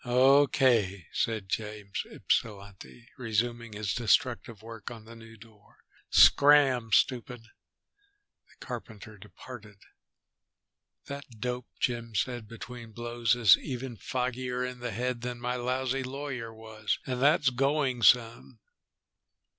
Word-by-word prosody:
"Okay," 125 - +3
said 110 -4 -1
James 105 -1 -4
Ypsilanti, 100 +2 -4
resuming 115 0 -2
his 105 -2 -3
destructive 120 -1 0
work 115 -2 -8
on 115 -2 -11
the 115 +1 -12
new 115 0 -14
door. 110 -2 -19 0.3
"Scram, 140 -5 +5
stupid." 125 +2 +1 1.1
The - - -15
carpenter 105 -2 -9
departed. 105 +2 -12 1.3
"That 140 0 -7
dope," 125 +1 -3
Jim 115 -2 -2
said 120 +1 -2
between 115 0 -10
blows, 120 -1 0
"is 115 -6 +7
even 125 -2 -6
foggier 125 +1 -3
in 125 0 -8
the 120 0 -4
head 120 +2 -3
than 120 0 -5
my 125 +1 -2
lousy 130 +2 -1
lawyer 130 -3 -5
was, 110 -1 -4
and 125 -1 -3
that's 140 -1 +4
going 135 -1 0
some." 115 +1 +3
120 Hz, 115 wpm, -29 LUFS, 110-125 Hz, 1.3 s, is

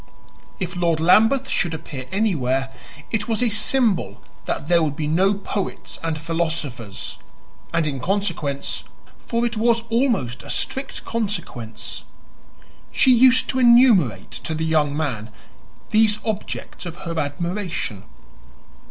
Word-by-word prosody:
If 180 -1 -4
Lord 170 -2 +1
Lambeth 225 +10 +4
should 165 -3 0
appear 140 -5 -7
anywhere, 135 - 0 0.4
it 220 0 -1
was 230 +1 +1
a 240 - +3
symbol 210 - +1 0.3
that - - -2
there 170 +1 +3
would 150 -3 0
be 155 - -2
no 185 +7 +3
poets 200 0 -4
and 160 -2 -2
philosophers; 125 -10 -3 0.5
and 165 -1 +1
in 140 -3 -2
consequence 170 -5 -1 0.4
for 235 0 +1
it 235 -1 -2
was 230 +1 +2
almost 225 - +1
a - - -12
strict 270 +1 -2
consequence 195 - -4 0.9
she 260 - +5
used 255 +1 +6
to 260 - 0
enumerate 235 - +5
to 160 - -4
the 160 +1 -1
young 150 -2 +1
man 120 -8 -2 0.6
these 215 -1 +4
objects 215 -3 -4
of 170 - -6
her 165 -1 -2
admiration. 165 - -3
170 Hz, 130 wpm, -22 LUFS, 145-220 Hz, 0.9 s, used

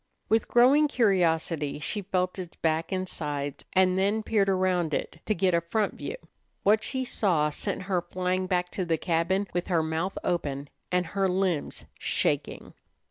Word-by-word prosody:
With 225 0 +2
growing 270 +5 +5
curiosity 170 - +1
she 205 +7 -3
felt 185 -1 -1
its 175 -2 -7
back 160 +2 0
and 185 -1 -1
sides, 145 -4 -4
and 185 0 +4
then 205 +3 +1
peered 205 -3 +2
around 185 -4 +1
it 160 - -4
to 215 - +2
get 185 +1 +2
a 170 - +3
front 205 +6 0
view. - - -5 0.5
What 215 +2 +4
she 260 -1 -1
saw 165 -11 +1
sent 150 - -3
her 185 -2 0
flying 185 +1 -2
back 180 -1 0
to 190 - -2
the 165 -2 0
cabin 175 +4 +1
with 175 0 -1
her 170 -4 +2
mouth 160 +4 -2
open 140 -5 -2 0.2
and 180 0 +2
her 195 -1 +2
limbs 180 -4 -1
shaking. - - -1
185 Hz, 170 wpm, -27 LUFS, 165-195 Hz, 0.5 s, growing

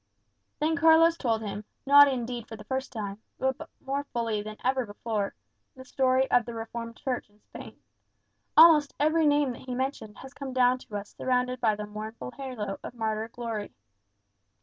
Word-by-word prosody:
Then 315 +2 +1
Carlos 330 0 +6
told 225 -7 -1
him, 205 0 -5 0.2
not 285 +1 +8
indeed 245 -3 -3
for 225 - -8
the 215 - -11
first 265 0 -3
time, 205 -2 -5 0.2
but 265 0 -2 0.2
more 275 +1 -1
fully 230 -5 -2
than 215 +1 -8
ever 260 0 +1
before, 205 -1 -3 0.4
the 260 0 -12
story 260 0 +2
of 245 - +5
the 235 - -6
Reformed 230 +1 -6
Church 255 -5 -3
in 205 +1 -28
Spain. - - -12 0.8
Almost 310 -3 +7
every 310 +2 +3
name 290 -2 +3
that 240 - -9
he 250 - -3
mentioned 255 -5 -4
has 265 +1 -11
come 275 -2 -7
down 255 0 +3
to 215 - -10
us 200 0 -9
surrounded 250 0 0
by 220 -3 +3
the 210 0 -5
mournful 210 - -7
halo 235 -8 -5
of - - -8
martyr 220 -1 -2
glory. 230 -3 -5
245 Hz, 175 wpm, -28 LUFS, 220-270 Hz, 0.8 s, not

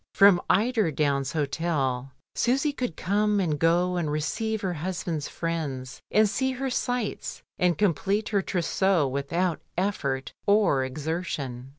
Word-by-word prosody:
From 195 -3 +7
Eiderdown's 155 - +2
Hotel 140 -4 -1 0.2
Susy 275 +4 +1
could 250 - -3
come 205 +2 +1
and 155 -6 0
go 175 +3 +2
and 165 -4 -1
receive 215 +9 -1
her 185 -2 -1
husband's 170 -2 -3
friends, 145 -7 -4
and 215 0 +4
see 260 +7 0
her 265 +1 -3
sights, 245 -3 -2 0.2
and 175 -3 +2
complete 200 +2 +1
her 200 -2 +2
trousseau 180 -2 +1
with 140 +1 -4
out 175 -1 0 0.2
effort 140 -9 -1
or 200 -10 +4
exertion. 140 -3 -4
175 Hz, 130 wpm, -26 LUFS, 145-205 Hz, 0.2 s, From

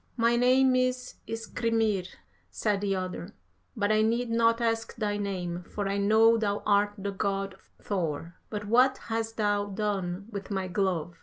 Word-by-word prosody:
"'My 235 0 +3
name 255 +2 +4
is 255 0 -1
Skrymir, 225 -4 0 0.4
said 205 -2 -1
the 200 -1 0
other, 185 +1 -5 0.4
'but 205 0 +1
I 215 0 +4
need 230 +2 +1
not 230 0 +3
ask 225 -1 -1
thy 210 -2 -1
name, 180 -4 -3
for 205 -1 -3
I 200 +1 0
know 220 +3 +5
thou 205 -2 -1
art 205 0 +3
the 200 0 -3
God 195 0 -2 0.3
Thor. 170 -4 -3 0.2
But 210 -1 -4
what 250 +5 +4 0.2
hast 225 0 -2
thou 205 -1 +1
done 195 -2 -2
with 200 -2 -6
my 190 -2 -2
glove?' 175 -3 -1
205 Hz, 160 wpm, -28 LUFS, 195-230 Hz, 0.4 s, know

